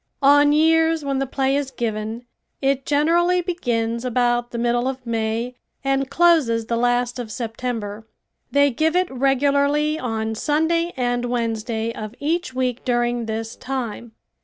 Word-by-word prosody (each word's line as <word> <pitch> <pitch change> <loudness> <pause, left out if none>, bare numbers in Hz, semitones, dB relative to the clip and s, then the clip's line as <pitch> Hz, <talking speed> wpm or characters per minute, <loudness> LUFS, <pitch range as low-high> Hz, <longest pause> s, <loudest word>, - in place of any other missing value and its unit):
On 290 +1 +6
years 320 0 +3
when 275 -1 0
the 270 - -1
play 270 +1 0
is 285 -2 -1
given 225 -1 -4 0.3
it 270 -1 0
generally 340 +5 +3
begins 235 -10 -1
about 240 -1 +1
the 240 - -6
middle 240 +1 +1
of 260 -1 -4
May 230 +1 -2 0.3
and 270 -1 0
closes 275 -8 +3
the 235 - -1
last 245 +1 +1
of 230 -3 -5
September. 225 -3 -4 0.4
They 285 0 +3
give 315 +7 +1
it 365 -3 +1
regularly 280 +3 +2
on 220 -3 -2
Sunday 320 +7 +1
and 245 -1 0
Wednesday 230 -1 -2
of 215 +1 -7
each 330 +1 -1
week 255 -2 -2
during 240 -1 0
this 225 +1 -4
time. 240 -3 -5
250 Hz, 145 wpm, -22 LUFS, 230-285 Hz, 0.4 s, On